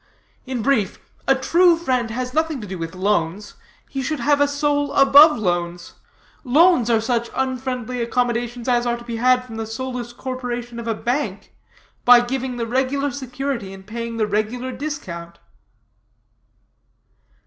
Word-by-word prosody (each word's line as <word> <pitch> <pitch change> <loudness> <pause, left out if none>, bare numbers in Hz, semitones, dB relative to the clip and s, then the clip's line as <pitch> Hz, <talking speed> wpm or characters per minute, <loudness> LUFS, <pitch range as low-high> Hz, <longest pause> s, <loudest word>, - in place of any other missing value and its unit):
In 255 -4 -3
brief, 230 -8 +1 0.3
a 270 - +5
true 335 +6 +4
friend 255 -8 -1
has 250 +2 -4
nothing 315 -2 0
to 215 - -7
do 190 -1 -6
with 165 +2 -5
loans; 190 0 -1 0.3
he 270 - -4
should 300 +3 -2
have 285 +3 +2
a 285 - +5
soul 285 0 0
above 285 +2 +7
loans. 175 -4 -2 0.5
Loans 290 -1 +4
are 230 -2 +4
such 235 +1 -1
unfriendly 255 -2 -2
accommodations 240 0 -1
as 245 -1 +2
are 240 0 0
to 235 - -11
be 235 -1 -5
had 250 +1 +3
from 225 -3 -9
the 225 -1 -4
soulless 245 +1 -5
corporation 245 -1 -5
of 235 - -6
a 225 - 0
bank, 235 -4 -3 0.5
by 245 0 +8
giving 250 +1 -3
the 230 - -2
regular 265 +4 0
security 260 -4 -4
and 190 0 -12
paying 230 +2 -5
the 220 - +2
regular 215 +5 -2
discount." 185 - -6
245 Hz, 155 wpm, -21 LUFS, 225-265 Hz, 0.5 s, by